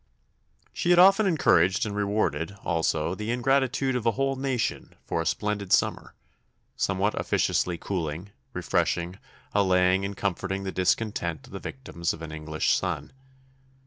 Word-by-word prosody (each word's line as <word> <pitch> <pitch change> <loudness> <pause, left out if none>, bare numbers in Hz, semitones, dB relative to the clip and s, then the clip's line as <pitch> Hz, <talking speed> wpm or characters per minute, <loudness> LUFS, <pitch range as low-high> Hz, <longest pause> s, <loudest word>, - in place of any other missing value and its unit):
She 175 - -1
had 175 - +6
often 195 +3 +7
encouraged 125 - +3
and 105 -1 -4
rewarded, 100 -4 -1
also, 80 0 0
the 105 +3 -5
ingratitude 130 +2 +1
of 125 - -1
a 115 - +2
whole 135 0 0
nation 130 -3 -2
for 85 - -1
a 80 - -2
splendid 105 -2 -2
summer, - - +1 0.6
somewhat 100 +2 0
officiously 90 -1 0
cooling, 85 +1 -4 0.2
refreshing, 85 +2 -1 0.3
allaying, 95 -1 +3
and 100 0 -4
comforting 95 0 -2
the 95 - -3
discontent 90 -5 -1
of - - -16
the - - -5
victims 85 -10 -4
of 80 - -11
an 80 - -6
English 75 0 0
sun. - - -3
100 Hz, 145 wpm, -26 LUFS, 85-120 Hz, 0.6 s, often